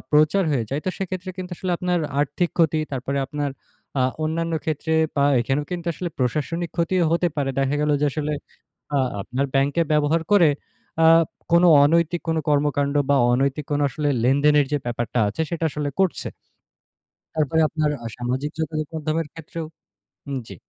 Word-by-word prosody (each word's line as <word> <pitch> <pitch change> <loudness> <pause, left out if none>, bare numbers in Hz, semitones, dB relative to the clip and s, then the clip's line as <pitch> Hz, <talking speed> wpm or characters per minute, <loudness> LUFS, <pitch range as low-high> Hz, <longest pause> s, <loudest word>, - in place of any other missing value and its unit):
প্রচার 155 +6 +4
হয়ে 125 -6 0
যায়, 140 +2 -1 0.2
সেক্ষেত্রে 185 -1 -4
কিন্তু 185 0 -5
আসলে 185 +1 -2
আপনার 180 -1 0 0.2
আর্থিক 165 +4 0
ক্ষতি, 160 -2 +3
তারপর 135 +1 -3
আপনার 145 +1 -3 0.5
আ - - +4 0.2
অন্যান্য 165 +1 -1
ক্ষেত্রে, 160 0 -2 0.2
বা 140 - +3 0.2
এখানে 135 +4 0
কিন্তু 175 -1 -4
আসলে 175 +2 -4
প্রশাসনিক 155 +6 -1
ক্ষতিও 175 +1 +2
হতে 170 +1 +2
পারে। 140 -2 0
দেখা 135 +1 +1
গেল 150 - +1
যে - - +2
আসলে 150 0 -2 0.6
আ - - +4 0.2
আপনার 130 +6 -2
ব্যাংকে 140 +4 +2
ব্যবহার 150 +2 +2
করে 175 -7 +6 0.5
আ - - +7 0.5
কোনো 170 +1 +6 0.2
অনৈতিক 170 +3 +2
কোনো 160 -1 +1
কর্মকাণ্ড 145 -1 +1 0.2
বা 140 - +5 0.2
অনৈতিক 135 +4 0
কোনো 145 0 +1
আসলে 145 +3 -2 0.2
লেনদেনের 145 +2 +4
যে 145 - +2
ব্যাপারটা 120 0 -2
আছে 105 +10 -2
সেটা 165 -1 -2
আসলে 150 0 -3
করছে। 190 -3 0 1.1
তারপরে 155 0 +1
আপনার 155 -2 0
আ - - -4
সামাজিক 130 +4 -2
যোগাযোগের 155 -1 -3
মাধ্যমের 160 +1 -1
ক্ষেত্রেও 165 0 -7 0.6
উম 140 - -3
জি। 100 - -9
150 Hz, 160 wpm, -23 LUFS, 140-165 Hz, 1.1 s, আ